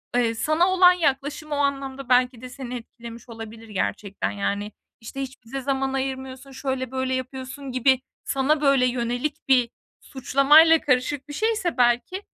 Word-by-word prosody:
eee, 230 -2 +2
sana 310 +8 +2
olan 370 -1 +6
yaklaşım 295 -1 -2
o 290 - 0
anlamda 275 -2 -2
belki 250 -1 +3
de 255 - -8
seni 250 -1 -7
etkilemiş 235 0 -10
olabilir 225 0 -10
gerçekten, 200 0 -3
yani, 205 +1 -3 0.3
işte, 250 +5 -7
hiç 265 -3 -8
bize 270 +4 -6
zaman 270 0 -1
ayırmıyorsun, 265 0 -4
şöyle 260 -1 -3
böyle 260 0 -2
yapıyorsun 260 +1 -5
gibi 255 +1 +2 0.2
sana, 285 +3 +1
böyle, 275 -3 +4
yönelik 245 +5 -2
bir 250 -3 +4 0.3
suçlamayla 295 +5 +5
karışık 265 +1 0
bir - - -6
şeyse 430 -3 -1
belki 245 +11 +1
265 Hz, 150 wpm, -24 LUFS, 245-280 Hz, 0.3 s, olan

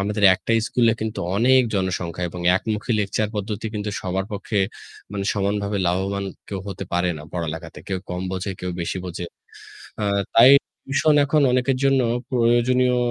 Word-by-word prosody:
আমাদের 105 +1 0
একটাই 115 +4 0
স্কুলে 115 -2 +3
কিন্তু 110 0 -3 0.2
অনেক 130 +4 +5
জনসংখ্যা 90 -2 -2
এবং 90 - -7 0.2
একমুখী 110 +3 -2
লেকচার 105 +1 -1
পদ্ধতি 105 +1 -3
কিন্তু 105 0 -3
সবার 95 +1 -2
পক্ষে 105 +1 -2 0.5
মানে 100 -1 -3
সমানভাবে 100 0 -1
লাভবান 95 +3 -1 0.2
কেউ 100 -2 -4
হতে 95 0 -5
পারে 90 +1 +1
না - - -9
পড়ালেখাতে। 80 -1 -5
কেউ 95 -1 -1
কম 90 +1 -3
বোঝে, 95 +1 -3
কেউ 90 - -3
বেশি 85 +2 -2
বোঝে। 90 -1 -5 0.8
আ - - +1 0.3
তাই 120 +3 +9 0.3
টিউশন 145 +3 +2
এখন 150 +2 +2
অনেকের 125 +1 +2
জন্য 135 -1 +4 0.3
প্রয়োজনীয় 125 +1 +3
100 Hz, 155 wpm, -22 LUFS, 95-115 Hz, 0.8 s, তাই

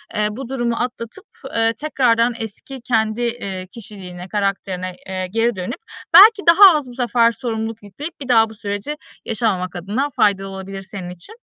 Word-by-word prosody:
eee, 210 -1 +2
bu 250 +3 -7
durumu 240 -3 -1
atlatıp, 235 -1 -5 0.3
eee, 225 0 +2
tekrardan 245 -5 +1
eski 230 +4 -8
kendi, 225 -1 0
eee, 200 -6 -3
kişiliğine, 185 -5 -9
karakterine, 190 -2 -2
eee, 185 -1 -3
geri 230 0 +1
dönüp 185 +7 -5 0.3
belki 420 0 +9
daha 365 +1 +9
az 285 -4 -5
bu - - -10
sefer 240 -2 +3
sorumluluk 225 -2 -4
yükleyip 290 - -8
bir 270 - -6
daha 225 -3 +4
bu 220 - -12
süreci 205 +8 -4 0.3
yaşamamak 195 -5 -1
adına 210 - -2
faydalı 195 -2 +2
olabilir 195 0 -7
senin 185 -2 -8
için. 180 - -10
225 Hz, 160 wpm, -20 LUFS, 195-245 Hz, 0.3 s, belki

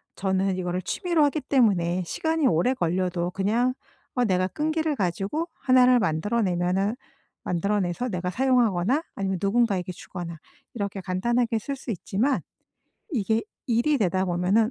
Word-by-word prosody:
저는 190 0 0
이거를 180 0 -2
취미로 340 - +1
하기 290 +2 0
때문에 190 -10 +2
시간이 320 - -1
오래 240 +5 +2
걸려도 180 -4 -1
그냥 225 +7 +1 0.4
어 250 -2 +2
내가 185 -3 +2
끈기를 310 - -1
가지고 200 - -1
1 255 -1 +5
를 250 0 +5
만들어 205 +6 0
내면은 185 +2 0 0.5
만들어내서 200 +5 -1
내가 180 -3 -2
사용하거나 245 - +2
아니면 190 -2 -2
누군가에게 200 -3 +1
주거나 175 -2 -7 0.4
이렇게 200 -3 -3
간단하게 230 +6 0
쓸 275 +6 -4
수 265 - -10
있지만 220 +7 0 0.7
이게 225 - 0 0.2
일이 245 +5 +2
되다 190 -3 +1
보면은 185 +5 +2
200 Hz, 340 characters per minute, -25 LUFS, 180-250 Hz, 0.7 s, 1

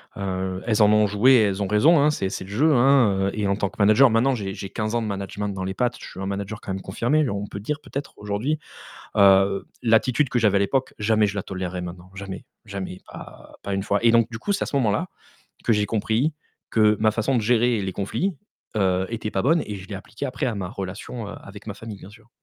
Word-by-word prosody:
Heu, 95 -1 -3
elles 110 -2 +2
en 105 - +7
ont 105 0 +5
joué 105 +6 +4
et 125 - +6
elles 100 -1 0
ont 100 - 0
raison, 145 - +5
hein, 150 +2 +4
c'est 95 -10 -2
c'est 95 - -5
le - - -13
jeu, 140 +11 +3
hein, 120 -7 +4
heu - - +1
et 105 - 0
en 100 0 +1
tant 100 - 0
que - - -13
manager 110 +6 +6
maintenant 125 +4 +2
j'ai 100 -4 -4
j'ai 100 - -7
15 110 +2 -3
ans 120 - +1
de 110 - -3
management 100 0 -4
dans 95 -1 -4
les 95 - -3
pattes, 120 +3 -1
je - - -9
suis 95 - -9
un - - -3
manager 100 +2 -4
quand - - -6
même 95 0 -3
confirmé 125 +8 0
on 100 +1 -3
peut 100 - -7
dire, 150 +8 -3
peut-être 140 +1 -6
aujourd'hui, 105 +9 -2 0.6
heu, 100 0 +5 0.2
l'attitude 120 +4 +3
que 125 - 0
j'avais 105 -4 +3
à - - -1
l'époque, 130 +7 0
jamais 110 0 +3
je 100 - -4
la 100 - -2
tolèrerai 95 -1 -4
maintenant, 90 0 -8
jamais, 95 -1 -7 0.2
jamais, 95 -2 -6
pas - - -12
pas 100 - -2
1 95 - -1
fois. 100 +1 +1
Et 115 - +6
donc 115 0 +4
du 115 - -6
coup, 200 - -1
c'est 200 - -1
à - - 0
ce 140 - -3
moment-là 105 -5 +1 0.6
que - - +2
j'ai 105 -2 +2
compris 115 +7 0 0.4
que 105 -1 +4
ma 110 0 +3
façon 110 +5 0
de 120 - +2
gérer 120 0 +3
les 95 -1 -2
conflits, 160 - -2 0.4
heu, 95 -2 +2
était 110 -2 -3
pas 95 - -1
bonne 160 +5 +3
et 105 - -4
je 95 0 -9
l'ai 105 - -7
appliquée 105 +7 -6
après 125 -2 -2
à 120 - -2
ma 95 -3 -3
relation, 100 +3 -6
heu, - - -7
avec 100 +1 -12
ma 100 - -5
famille 105 -1 -9
bien 95 - -12
sûr. 105 +2 -18
105 Hz, 255 wpm, -24 LUFS, 100-120 Hz, 0.6 s, en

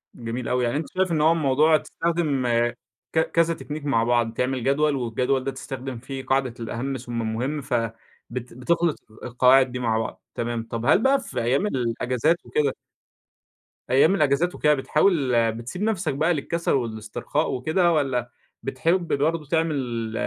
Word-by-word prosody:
جميل 115 +1 -5
أوي، 125 0 +1
يعني 120 +4 0
أنت 155 - -3
شايف 190 -1 +2
إن 155 -2 +1
هو 160 +2 +5
الموضوع 155 0 +4
تستخدم 155 -7 -1 0.7
ك 160 - +3
كذا 165 +1 +2
تكنيك 150 -2 -7
مع 125 -6 +2
بعض: 120 -1 +1
تعمل 125 +1 -1
جدول، 145 +2 +2
والجدول 125 +2 0
ده 135 - -2
تستخدم 130 -1 -6
فيه 130 +2 -7
قاعدة 135 -3 +1
الأهم 120 +4 -3
ثم 120 -1 -4
المهم، 120 +7 -2
ف 135 -2 -6 0.6
بت 125 0 -6
بتخلط 165 +5 +1 0.2
ال 110 - -17
القواعد 125 +2 +4
دي 125 - -4
مع 115 -2 +1
بعض. 110 - -5
تمام، 120 -1 -2
طب 115 0 -3
هل 160 - +4
بقى 275 +1 +4
في - - -4
أيام 135 - +1
الأجازات 125 - 0
وكده 145 -3 0 1.2
أيام 140 +9 +5
الأجازات 155 +3 +2
وكده، 150 0 +3
بتحاول 145 -1 +2 0.2
بتسيب 120 - -7
نفسك 210 -8 0
بقى 160 +5 +2
للكسل 170 +3 -2
والاسترخاء 115 +4 -1
وكده، 160 +7 +1
والّا 130 -6 0 0.3
بتحب 165 +7 0
برضو 155 +2 0
تعمل 135 -8 -1
135 Hz, 160 wpm, -24 LUFS, 120-160 Hz, 1.2 s, هو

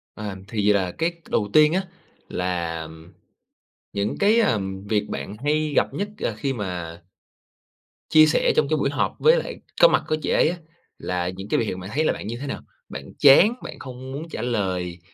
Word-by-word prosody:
Ờm, 100 -3 -6
thì 105 -2 +2
là 95 -3 0
cái 165 +1 +1 0.2
đầu 105 -2 0
tiên 155 +1 +6
á, 190 +2 +1 0.5
là 85 -3 -2 1.1
những 100 +1 -2
cái 215 +3 +4 0.5
việc 105 -2 0
bạn 105 - -5
hay 150 0 +1
gặp - - +2
nhất, 205 +1 -3
ờ, - - -1
khi 135 +4 -1
mà 90 -6 -5 1.1
chia 155 0 +7
sẻ 155 - +2
trong 145 - +3
cái 155 - +2
buổi 140 - +1
họp 145 - -1
với 475 +1 +6
lại - - -4 0.2
có - - +10
mặt - - +2
của 155 - +1
chị - - -3
ấy - - +4
á, 175 - -4 0.4
là 90 -1 -2
những 95 +2 -8
cái - - +2
biểu 115 - 0
hiện 95 - -4
bạn 95 +1 -8
thấy 155 +3 +1
là - - +2
bạn - - -7
như 115 +2 -4
thế 145 - -6
nào? - - -4 0.3
Bạn 65 - -7 0.2
chán, 145 - +7
bạn - - -8
không 130 0 -8
muốn 155 +5 -6
trả 110 - -5
lời 95 -7 -2
115 Hz, 200 wpm, -23 LUFS, 95-155 Hz, 1.1 s, có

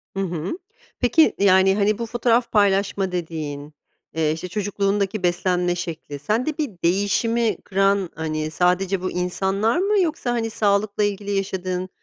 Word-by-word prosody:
Hı - - -3
hı. 175 - -3 0.4
Peki, 285 +6 +4
yani, 190 -1 +5
hani, 205 0 +2
bu 235 - -3
fotoğraf 235 +1 +1
paylaşma 195 -2 +2
dediğin, 155 -4 -5 0.4
eee, 160 -1 +1
işte, 160 +3 -4
çocukluğundaki 200 0 -1
beslenme 175 0 +1
şekli, 160 -5 -6
sende 235 - -1
bir 300 -4 -1
değişimi 210 +6 +1
kıran, 195 -1 +1
hani, 155 -1 -3
sadece 180 +3 +1
bu 185 - -2
insanlar 190 - 0
mı 400 +2 +2
yoksa, 310 -7 -1
hani, 230 -2 -1
sağlıkla 205 -1 +1
ilgili 205 0 -2
yaşadığın 185 -2 -2
195 Hz, 140 wpm, -22 LUFS, 180-215 Hz, 0.4 s, yani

